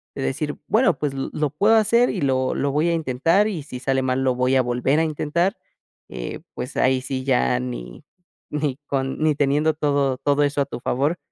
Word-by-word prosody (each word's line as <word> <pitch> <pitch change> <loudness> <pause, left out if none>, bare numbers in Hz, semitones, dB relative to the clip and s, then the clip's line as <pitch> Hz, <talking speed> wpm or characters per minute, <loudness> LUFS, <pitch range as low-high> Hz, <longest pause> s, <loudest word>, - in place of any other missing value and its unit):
de - - -5
decir: 65 0 -2
"Bueno, - - +3
pues 145 -2 -1
lo 135 0 -4
lo 150 -1 0
puedo 205 +11 +3
hacer 230 +3 +4
y 195 - -2
lo 130 -2 +1
lo 140 - -1
voy 150 +4 +1
a - - +1
intentar, 165 +6 +2
y 180 -9 -4
si 130 -3 -8
sale 135 +1 0
mal 130 0 0
lo 130 -1 +1
voy 125 +1 +1
a - - +5
volver 125 +4 +1
a - - +3
intentar", 160 +5 -1 0.5
eh, - - -6
pues - - -6
ahí 130 0 +2
sí 130 0 -4
ya 125 -1 +2
ni 125 +3 -7 0.5
ni 150 -3 -1
con 135 -1 -2
ni 155 -1 +3
teniendo 145 +2 +2
todo 140 -3 0
todo 145 +2 +1
eso 145 0 0
a - - +1
tu 140 - -7
favor, 145 +9 0
140 Hz, 210 wpm, -22 LUFS, 130-155 Hz, 0.5 s, a